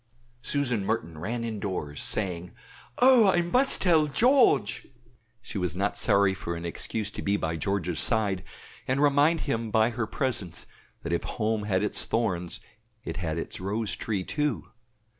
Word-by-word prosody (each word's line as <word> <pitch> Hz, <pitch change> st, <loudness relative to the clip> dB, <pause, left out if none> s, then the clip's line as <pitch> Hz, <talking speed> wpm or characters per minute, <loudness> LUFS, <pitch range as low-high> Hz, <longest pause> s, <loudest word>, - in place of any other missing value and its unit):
Susan 125 Hz, -8 st, 0 dB
Merton 85 Hz, -7 st, -3 dB
ran 115 Hz, +8 st, -3 dB
indoors, 100 Hz, -10 st, -4 dB
saying, 90 Hz, -4 st, -1 dB, 0.4 s
"Oh! 250 Hz, -4 st, +6 dB
I 175 Hz, -2 st, +3 dB
must 255 Hz, +11 st, +3 dB
tell 160 Hz, -5 st, +4 dB
George." 145 Hz, -, +3 dB, 0.6 s
She 100 Hz, -, -5 dB
was 90 Hz, -1 st, -2 dB
not 100 Hz, +2 st, -1 dB
sorry 100 Hz, -3 st, +3 dB
of 95 Hz, -, -8 dB
an 85 Hz, 0 st, -3 dB
excuse 105 Hz, +5 st, -2 dB
to -, -, -6 dB
be 100 Hz, +1 st, +1 dB
by 80 Hz, -3 st, -2 dB
George's 90 Hz, -2 st, -2 dB
side, 105 Hz, -5 st, +2 dB, 0.5 s
and 130 Hz, +1 st, +1 dB
remind 145 Hz, +3 st, +3 dB
him 115 Hz, 0 st, -2 dB
by 110 Hz, +2 st, +3 dB
her 115 Hz, -1 st, -3 dB
presence 110 Hz, -, -3 dB, 0.4 s
that 85 Hz, -, -3 dB
if 85 Hz, -, 0 dB
home 110 Hz, -2 st, -2 dB
had 95 Hz, -1 st, 0 dB
its 105 Hz, -, 0 dB
thorns 90 Hz, -7 st, -2 dB, 0.4 s
it -, -, -5 dB
had 80 Hz, -3 st, -3 dB
its 85 Hz, -, -4 dB
rose 105 Hz, +3 st, -2 dB
tree, 105 Hz, -4 st, -3 dB
too. 150 Hz, +3 st, -2 dB
105 Hz, 160 wpm, -27 LUFS, 90-130 Hz, 0.6 s, Oh